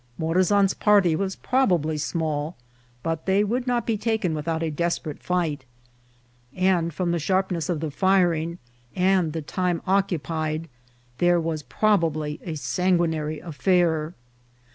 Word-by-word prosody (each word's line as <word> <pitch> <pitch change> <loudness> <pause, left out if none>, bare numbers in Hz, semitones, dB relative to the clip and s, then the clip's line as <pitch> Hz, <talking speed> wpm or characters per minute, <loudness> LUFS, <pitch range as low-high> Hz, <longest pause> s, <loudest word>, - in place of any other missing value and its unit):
Morazan's 185 +4 +3
party 200 -6 +4
was 190 +2 -2
probably 175 - +1
small, 155 0 -2 0.5
but 165 +1 -3
they 195 +2 +3
would 245 +4 -1
not 240 -2 0
be 225 -2 0
taken 215 -6 0
without 160 +2 -2
a 160 - -1
desperate 170 -1 -2
fight; 165 -6 -1 0.9
and 185 -3 +2
from 175 +2 -1
the 170 - 0
sharpness 185 -1 0
of 165 -4 -1
the 160 -2 -3
firing 175 -2 +2 0.4
and 185 -3 +2
the 160 0 -4
time 180 +2 -1
oc 195 +1 +3
cupied, 160 -2 -3 0.5
vlhere 175 0 +4
was 160 -2 -2
probably 155 -6 0
a 165 -3 -4
sanguinary 160 -2 0
affair. 170 -1 +1
170 Hz, 135 wpm, -24 LUFS, 160-190 Hz, 0.9 s, party